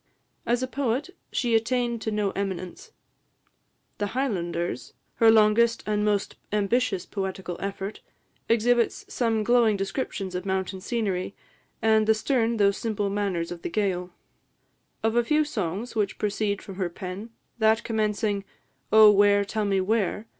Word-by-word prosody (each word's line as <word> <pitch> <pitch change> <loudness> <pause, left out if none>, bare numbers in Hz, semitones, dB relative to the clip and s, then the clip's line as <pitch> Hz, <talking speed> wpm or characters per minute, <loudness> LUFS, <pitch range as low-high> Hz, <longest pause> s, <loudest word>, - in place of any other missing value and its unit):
As 240 +2 +1
a - - -1
poet, 265 +4 -2 0.2
she 240 -3 0
attained 235 0 +1
to 220 - -2
no 210 -2 0
eminence. 195 - -5 1.1
"The 205 +2 -3
Highlanders," 175 - -2 0.2
her 225 - +6
longest 225 +1 +4
and 210 -1 0
most 205 -1 0
ambitious 210 -1 +1
poetical 190 -2 -4
effort, 195 +1 -5 0.5
exhibits 235 +1 +2
some 225 -3 +1
glowing 230 -2 +4
descriptions 195 -2 -3
of 180 0 -3
mountain 190 0 -2
scenery, 200 -5 -2 0.5
and 220 -1 +4
the 220 - +5
stern 230 0 +1
though 200 -1 +4
simple 205 -1 -2
manners 195 -5 -1
of 175 -1 -7
the - - -4
Gaël. 180 -2 -1 0.9
Of 225 +1 +1
a 240 - +4
few 305 +5 +2
songs 215 - -4
which 210 -2 0
proceed 205 -1 -1
from 195 -2 -9
her 185 -3 -1
pen, 185 +5 -7 0.3
that 220 +1 +3
commencing, 210 -2 -1 0.5
"Oh, 215 -1 +9
where, 205 0 +4
tell 215 +1 -2
me 195 -1 +1
where?" 210 +1 0
210 Hz, 145 wpm, -26 LUFS, 195-230 Hz, 1.1 s, Oh